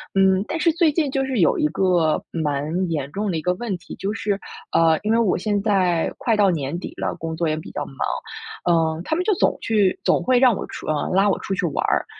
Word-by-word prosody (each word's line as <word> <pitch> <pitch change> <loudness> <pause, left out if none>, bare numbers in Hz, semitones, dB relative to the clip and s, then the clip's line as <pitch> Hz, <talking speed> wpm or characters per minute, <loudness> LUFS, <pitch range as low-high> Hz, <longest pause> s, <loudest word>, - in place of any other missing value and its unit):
嗯， 190 0 +4
但 325 - -2
是 335 +1 +3
最 335 -2 +3
近 295 -1 0
就 270 -1 0
是 265 -4 -2
有 165 - +3
一 - - +1
个 170 -1 +1
蛮 155 +3 -1
严 140 -3 -2
重 205 0 -1
的 165 - -1
一 155 - -3
个 180 +2 +1
问 205 -4 -3
题， 175 - -10
就 200 +2 -3
是， 205 -3 -1 0.4
呃， 160 -1 +4
因 215 +2 +1
为 230 - +3
我 215 -5 +2
现 205 +1 -1
在 185 -6 +1
快 225 -3 +1
到 205 -2 +4
年 155 0 -2
底 - - -7
了， - - -2
工 160 0 -5
作 165 0 0
也 155 - 0
比 155 - -8
较 145 - -4
忙， 135 - -13 0.7
嗯， 160 -1 +2
他 - - 0
们 355 - 0
就 420 +1 +2
总 - - +1
去 205 -4 +2
总 - - +2
会 255 -1 +3
让 250 -4 +5
我 - - -4
出 - - -9
呃， 150 -1 -1
拉 195 +2 +4
我 - - 0
出 195 - -3
去 180 - -1
玩 145 - -1
儿， - - +1
190 Hz, 270 characters per minute, -22 LUFS, 160-220 Hz, 0.7 s, 让